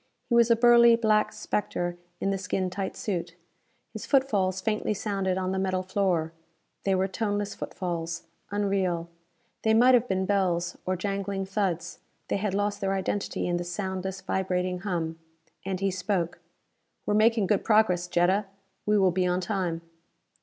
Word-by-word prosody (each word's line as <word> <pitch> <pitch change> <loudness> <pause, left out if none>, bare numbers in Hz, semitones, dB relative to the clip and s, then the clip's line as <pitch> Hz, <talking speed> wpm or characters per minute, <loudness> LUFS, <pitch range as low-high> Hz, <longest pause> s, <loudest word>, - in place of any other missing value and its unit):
He - - 0
was 235 0 +5
a 230 - +6
burly 235 0 +7
black 215 -2 +2
spectre 175 -4 -2 0.2
in 195 - 0
the 195 - -1
skin 185 0 -2
tight 190 0 -4
suit. 175 -4 -3 0.6
His - - -7
footfalls 205 -10 +2
faintly 215 +1 -1
sounded 195 -2 -1
on 185 0 -1
the 190 - -1
metal 185 -1 0
floor. 185 -4 0 0.5
They 195 -1 +3
were 190 +1 +1
toneless 205 0 -2
footfalls. 170 -3 -4 0.3
Unreal. 195 -4 0 0.5
They 220 0 +3
might 250 +3 +6
have 245 0 +4
been 190 -2 0
bells, 180 -3 +1
or 185 - +1
jangling 195 +1 -2
thuds; 185 -4 -2 0.3
they - - +1
had 195 -1 -1
lost 205 0 -1
their 195 0 0
identity 195 +1 -2
in 175 0 0
this 175 0 -4
soundless, 190 0 -3
vibrating 180 -1 -1
hum. 170 -4 -3 0.5
And 190 -1 -2
he 195 0 +1
spoke, 180 -2 -2 0.7
"We - - -1
are - - +3
making 220 0 +4
good 200 +1 +1
progress, 200 -5 +3
Jetta. 180 +4 +2 0.4
We 210 0 +4
will 190 -2 +4
be 180 +1 +1
on 180 0 +1
time." 180 -3 -2
190 Hz, 165 wpm, -27 LUFS, 180-205 Hz, 0.7 s, burly